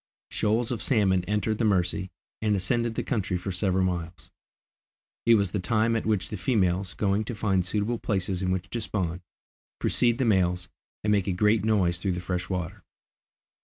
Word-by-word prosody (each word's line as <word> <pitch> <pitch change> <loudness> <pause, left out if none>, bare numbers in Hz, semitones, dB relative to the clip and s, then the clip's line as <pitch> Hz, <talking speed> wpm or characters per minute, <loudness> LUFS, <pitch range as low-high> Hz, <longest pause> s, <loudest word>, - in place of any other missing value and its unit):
Shoals 110 +3 +1
of 120 - -2
salmon 95 -8 +2
entered 105 +2 -1
the - - +1
Mercy, 95 -2 +1 0.3
and 105 -1 +2
ascended 115 +4 0
the - - -1
country 100 -8 -1
for 95 +2 -4
several 95 0 +1
miles. 85 -3 -4 1.0
It 115 - +8
was 100 -4 +1
the 100 - -1
time 110 +5 +1
at 110 - -1
which 105 -4 0
the 105 - -4
females, 95 -2 0
going 100 +1 +1
to 120 - -5
find 100 -4 +1
suitable 105 +5 -1
places 95 -2 -1
in 95 - -1
which 95 0 -1
to 120 - -2
spawn, 90 -5 -2 0.6
precede 120 -1 +2
the 130 - +1
males 90 -4 +1 0.3
and 105 - +1
make 100 -2 +2
a - - +1
great 105 +4 +2
noise 95 -6 +2
through 95 -2 -1
the 90 - -3
fresh 90 0 -3
water. 90 +1 -4
100 Hz, 185 wpm, -27 LUFS, 90-110 Hz, 1.0 s, It